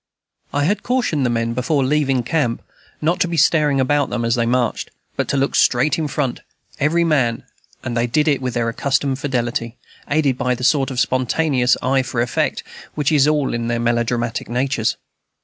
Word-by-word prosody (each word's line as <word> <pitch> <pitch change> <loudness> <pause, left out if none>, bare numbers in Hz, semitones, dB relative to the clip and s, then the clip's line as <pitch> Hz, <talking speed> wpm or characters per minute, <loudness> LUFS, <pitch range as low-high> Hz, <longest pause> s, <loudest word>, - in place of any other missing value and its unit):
I 145 - 0
had 200 +8 +1
cautioned 240 - 0
the - - 0
men, 115 0 -1
before 135 +4 0
leaving 135 -3 +1
camp, 120 -2 -1 0.4
not 170 +4 +1
to 190 - +2
be 170 -1 -3
staring 150 -2 +3
about 140 +1 +1
them 120 -1 -2
as 115 - +1
they 115 -1 +1
marched, 120 -1 0 0.3
but - - -1
to - - 0
look 135 +1 0
straight 130 +5 +3
to - - +1
the 155 - -1
front, 140 -3 -2 0.4
every 165 +4 +2
man; 130 -8 +1 0.4
and 120 -2 -4
they 120 0 +1
did 150 +5 +1
it 140 -3 +2
with 125 -1 -3
their 120 -1 0
accustomed 135 +3 -1
fidelity, 120 -3 -2 0.3
aided 145 -4 +1
by 125 0 +1
the 125 - -8
sort 135 0 +2
of 130 -2 -3
spontaneous 130 0 +1
eye 135 +1 +2
for 125 -1 -4
effect 120 0 -1 0.3
which 150 -1 0
is 145 -2 +4
in - - +4
all 150 -3 0
their 115 0 -2
melodramatic 120 +1 -1
natures. 125 -2 0
130 Hz, 195 wpm, -20 LUFS, 120-150 Hz, 0.4 s, is